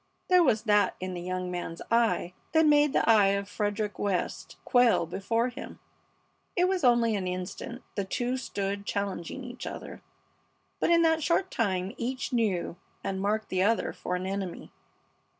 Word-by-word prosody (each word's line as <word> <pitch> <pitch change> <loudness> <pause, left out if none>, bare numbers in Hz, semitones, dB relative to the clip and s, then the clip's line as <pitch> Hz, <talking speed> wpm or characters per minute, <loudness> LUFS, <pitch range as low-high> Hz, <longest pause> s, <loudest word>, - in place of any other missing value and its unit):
There 365 -1 +6
was 225 -10 +3
that 210 -2 +3
in 185 0 -4
the 175 - -5
young 185 0 -3
man's 175 -2 -5
eye 225 -6 +2 0.2
that 320 0 +5
made 295 -1 +5
the - - +1
eye 215 -3 +6
of 200 0 -4
Frederick 205 0 -2
West 195 -3 -2
quail 245 -8 +4
before 225 +8 -1
him. - - -9 0.8
It 360 0 +3
was 370 -3 0
only 235 -3 +4
an 190 -2 -2
instant 185 +7 -5
the 200 - -1
two 245 +6 -1
stood 200 -5 -3
challenging 200 +4 -3
each 245 +1 -7
other, - - -7 0.8
but - - +1
in 335 0 +5
that 320 -1 +3
short 360 +4 +1
time 190 -4 -1
each 255 +2 -3
knew 200 -7 0 0.3
and 190 -1 -2
marked 215 +2 0
the 185 0 0
other 220 +4 +2
for 180 - -3
an 180 +1 -3
enemy. 190 -2 -4
210 Hz, 170 wpm, -28 LUFS, 185-245 Hz, 0.8 s, There